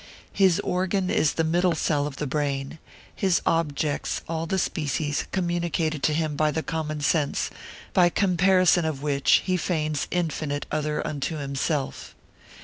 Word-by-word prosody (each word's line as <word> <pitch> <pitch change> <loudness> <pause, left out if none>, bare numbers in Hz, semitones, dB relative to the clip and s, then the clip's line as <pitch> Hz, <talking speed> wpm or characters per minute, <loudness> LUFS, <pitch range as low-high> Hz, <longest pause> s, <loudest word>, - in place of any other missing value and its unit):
His 190 -4 +4
organ 185 +1 0
is 150 - +2
the 165 - 0
middle 175 +2 +2
cell 145 -2 0
of 145 - -7
the 150 - -3
brain; 140 +1 -2 0.4
his 190 -3 +2
objects 150 -3 0
all 165 0 -3
the 190 - 0
species 150 -3 -1
communicated 170 -4 -1
to 155 - +2
him 155 -2 -1
by 155 +1 +2
the 160 +1 -2
common 155 -2 -3
sense, 145 0 +1 0.4
by 175 -1 +5
comparison 185 -1 +3
of 155 -3 -3
which 140 -2 +3
he 185 -1 +1
feigns 155 -4 -1
infinite 155 -4 -2
other 150 0 -1
unto 150 +2 -3
himself. 140 0 -3
160 Hz, 145 wpm, -25 LUFS, 150-175 Hz, 0.4 s, by